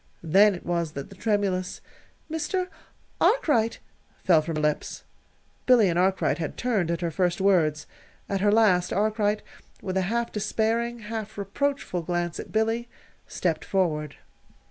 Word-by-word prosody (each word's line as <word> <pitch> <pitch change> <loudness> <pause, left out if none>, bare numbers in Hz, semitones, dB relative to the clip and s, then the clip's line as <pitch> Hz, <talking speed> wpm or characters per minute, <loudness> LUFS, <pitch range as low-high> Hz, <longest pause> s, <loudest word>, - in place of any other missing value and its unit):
Then 195 +5 +5
it 175 - -11
was 170 -3 -1
that 140 +4 -6
the - - -11
tremulous 195 -3 -1 0.5
"Mr. 360 +4 -2 0.5
Arkwright!" 245 - +3 0.5
fell 165 -4 +5
from 160 +1 -4
her 155 - -1
lips. 150 -1 -1 0.6
Billy 235 -6 +6
and 170 0 +1
Arkwright 180 -4 +1
had 160 - -4
turned 215 -9 0
at 170 0 -1
her 170 -1 -1
first 175 +1 0
words. 165 -6 +2 0.4
At 195 -1 -1
her 205 0 +4
last, 195 -5 +3
Arkwright, 210 0 +1 0.4
with 190 -1 -3
a - - +3
half 235 +1 -1
despairing, 230 +3 -1
half 215 0 -6
reproachful 205 -1 -2
glance 175 0 -2
at - - -8
Billy, 225 +2 0 0.4
stepped 165 -4 -1
forward. 155 -6 -1
195 Hz, 145 wpm, -26 LUFS, 175-220 Hz, 0.6 s, Billy